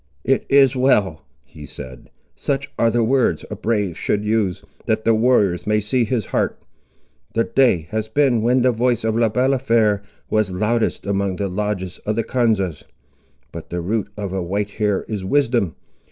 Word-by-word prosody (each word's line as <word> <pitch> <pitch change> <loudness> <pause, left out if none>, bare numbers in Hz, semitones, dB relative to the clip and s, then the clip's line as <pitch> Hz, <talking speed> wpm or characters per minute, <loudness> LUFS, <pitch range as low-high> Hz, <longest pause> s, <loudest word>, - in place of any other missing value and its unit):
"It 135 +1 +1
is 135 -2 +5
well," 105 - +2 0.2
he - - -12
said; 65 -1 -10 0.2
"such 140 -1 -3
are 115 - +4
the 115 +1 +1
words 130 +2 +1
a - - -3
brave 105 -4 -1
should 105 +4 -1
use, 105 -4 0 0.2
that 110 -1 0
the 115 - +4
warriors 110 -6 +2
may 105 0 +3
see 115 +4 0
his 110 -3 -1
heart. - - 0 0.8
The 115 - +3
day 120 -14 +2
has 110 0 -2
been 125 -1 +2
when 125 +2 +2
the 130 - +4
voice 120 0 0
of 110 -1 0
Le 115 -1 +3
Balafré 115 -4 +2 0.3
was 110 -3 +1
loudest 110 +5 -1
among 100 -1 -1
the 100 +1 -2
lodges 95 -2 -3
of 105 - -3
the 115 - 0
Konzas. 110 - 0 0.7
But 85 - -9
the 90 - -3
root 105 +4 -1
of 100 -3 -4
a 95 - -1
white 100 +4 -2
hair 105 -2 0
is 105 -4 -4
wisdom. 120 - +1
110 Hz, 175 wpm, -20 LUFS, 100-120 Hz, 0.8 s, is